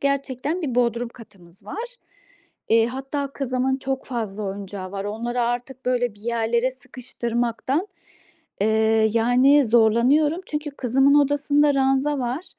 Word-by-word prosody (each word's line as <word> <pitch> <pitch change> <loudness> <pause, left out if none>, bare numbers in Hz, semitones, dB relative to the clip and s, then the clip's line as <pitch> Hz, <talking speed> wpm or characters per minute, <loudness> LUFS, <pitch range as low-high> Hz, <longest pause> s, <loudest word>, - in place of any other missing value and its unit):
gerçekten 280 +4 -2
bir 260 -5 -2
bodrum 235 -1 +1
katımız 195 -5 -17
var. 450 - -5 0.8
Eee, 225 0 +5
hatta 270 +2 -4
kızımın 265 0 -1
çok 265 0 -3
fazla 215 -5 -4
oyuncağı 195 -1 -6
var. 195 0 -4
Onları 235 +4 -3
artık, 245 +2 -3
böyle, 245 -3 0
bir 205 - -21
yerlere 235 +2 0
sıkıştırmaktan, 245 - -3 0.8
eee, 220 0 +3
yani, 250 +5 +4
zorlanıyorum. 240 +9 +3
Çünkü 300 0 -4
kızımın 270 +1 +2
odasında 290 0 +3
ranza 270 +2 +1
var. 250 +8 -3
245 Hz, 125 wpm, -23 LUFS, 225-275 Hz, 0.8 s, Eee